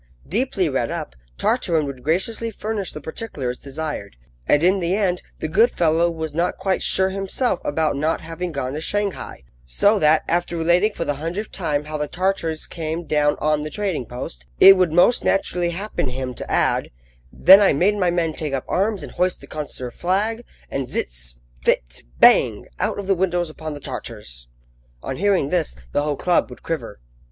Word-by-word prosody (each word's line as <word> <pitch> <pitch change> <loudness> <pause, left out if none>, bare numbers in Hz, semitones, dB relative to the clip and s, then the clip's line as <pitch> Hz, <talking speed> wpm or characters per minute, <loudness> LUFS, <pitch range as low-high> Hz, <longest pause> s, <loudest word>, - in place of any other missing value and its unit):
Deeply - - 0
read - - -1
up, - - -5 0.2
Tartarin 160 - +1
would 135 -3 -6
graciously 195 +9 0
furnish 215 -3 -4
the - - -7
particulars 145 - -5
desired, 140 - -5 0.3
and, 145 - +4
in 190 +2 +4
the 175 +1 0
end, 185 -4 0 0.2
the - - -3
good 215 +10 +4
fellow 170 -2 +2
was 160 -2 -4
not 170 +3 0
quite 190 -1 0
sure 190 0 +3
himself 195 +2 -1
about 155 0 0
not 155 +3 0
having 165 +2 -5
gone 135 -3 -3
to 155 - -4
Shanghai, 205 - -3 0.2
so 200 - +2
that, 155 -1 +4
after 175 0 0
relating 175 +6 +3
for 165 - -3
the 145 - -1
hundredth 180 +7 -4
time 150 -6 -1
how 155 0 -4
the 150 - -1
Tartars 175 -3 -1
came 165 0 -4
down 150 -1 +2
on 150 0 +1
the 155 - -4
trading 180 - -2
post, 65 - -7
it 195 0 +10
would 185 -4 +2
most 175 +9 +4
naturally 180 -2 +1
happen 180 -5 -3
him 130 0 -4
to - - -8
add: - - +2 0.4
"Then 190 +2 +8
I 200 - +5
made 185 +9 +2
my 185 -3 +2
men 170 -2 0
take 150 -2 -4
up 130 - -4
arms 200 -2 0
and - - -8
hoist 180 0 0
the - - -12
consular 140 -5 -6
flag, 210 - -1 0.3
and 135 -2 -2
zizz! - - -4 0.3
phit! - - 0 0.2
bang! - - +5
out - - 0
of 200 - -4
the 195 - +3
windows 175 -2 0
upon 155 -1 -6
the - - -7
Tartars." 105 - -7 0.6
On 135 - -4
hearing 195 -7 +2
this, 170 - 0 0.2
the - - +1
whole 150 0 -1
club 180 -1 +2
would - - -12
quiver. 160 -10 -4
165 Hz, 185 wpm, -22 LUFS, 145-190 Hz, 0.6 s, it